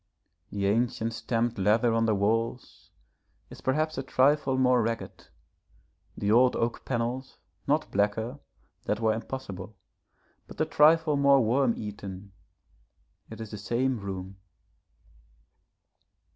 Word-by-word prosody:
The 100 -1 -2
ancient 115 +2 0
stamped 115 0 -1
leather 110 +4 +3
on 115 0 +2
the 110 - +2
walls 115 +4 -2 0.6
is - - -11
perhaps 155 +3 0
a - - -1
trifle 135 +1 +2
more 125 -1 +4
ragged, 115 0 -4 0.9
the 100 - 0
old 125 +3 +5
oak 115 0 -2
panels 125 +1 -3 0.3
not 150 +3 +1
blacker 110 +6 -1 0.5
that 105 - -1
were 110 -1 +2
impossible 110 -4 -7 0.7
but - - -13
a - - +2
trifle 155 0 +4
more 140 -3 +5
worm 125 +1 +2
eaten; 100 -2 -7 1.0
it 110 - -9
is 110 -2 -7
the 105 - -6
same 120 +4 -1
room. 95 -1 -6
115 Hz, 120 wpm, -28 LUFS, 105-130 Hz, 1.0 s, old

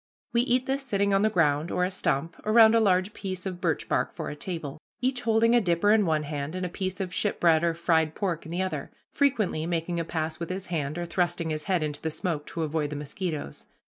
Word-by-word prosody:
We 235 - +4
eat 250 +1 +1
this 270 +1 -1
sitting 200 -6 0
on 195 - +4
the 215 - +4
ground, 160 -4 +2
or 180 - +1
a 185 - -2
stump, 165 -3 -1
around 220 +1 +6
a 230 - +5
large 190 -1 +2
piece 185 -2 -5
of 185 -2 -5
birch - - 0
bark - - 0
for - - -4
a - - -6
table, 155 -3 -5 0.2
each 255 0 0
holding 230 0 +3
a 240 - +5
dipper 180 +2 +2
in 210 -3 +4
one 155 -1 +1
hand 145 +2 -4
and 185 0 -2
a - - -3
piece 185 +1 -4
of 185 -2 -3
ship 205 - -1
bread 165 -2 +4
or 170 -1 +1
fried 160 -2 +1
pork 180 -6 -2
in - - -10
the 180 +2 0
other, 185 - -4 0.2
frequently 215 - +1
making 170 0 -1
a - - 0
pass 160 0 -3
with 170 - -4
his 190 +1 -4
hand, 150 -1 -2
or 175 - -2
thrusting 170 -1 -1
his 155 -1 -3
head 180 -5 +1
into 150 -1 -4
the 160 - -1
smoke, 155 -1 -3
to 165 - -3
avoid 155 -1 -1
the 150 - -5
mosquitoes. 150 - -5
175 Hz, 245 wpm, -27 LUFS, 160-200 Hz, 0.2 s, around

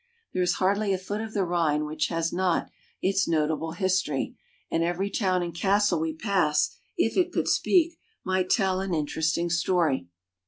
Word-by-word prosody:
There 185 - 0
is 180 0 +2
hardly 200 +2 +1
a - - +1
foot 205 +3 -4
of 220 0 -7
the 200 - +2
Rhine 160 -4 +1
which 155 +1 -1
has 165 -1 -1
not 180 -1 0 0.3
its 195 +1 +2
notable 160 0 0
history, 185 -6 0 0.4
and 165 - +1
every 180 +4 -1
town 185 -4 +1
and 170 -1 -4
castle 195 0 +2
we 160 0 -2
pass, 175 -6 +1 0.3
if 225 - +1
it 360 -1 +2
could - - -1
speak, 340 -2 +2 0.2
might 185 -1 0
tell 190 -4 +2
an 190 -3 -1
interesting 160 +3 0
story. 170 - +1
180 Hz, 170 wpm, -26 LUFS, 160-195 Hz, 0.4 s, is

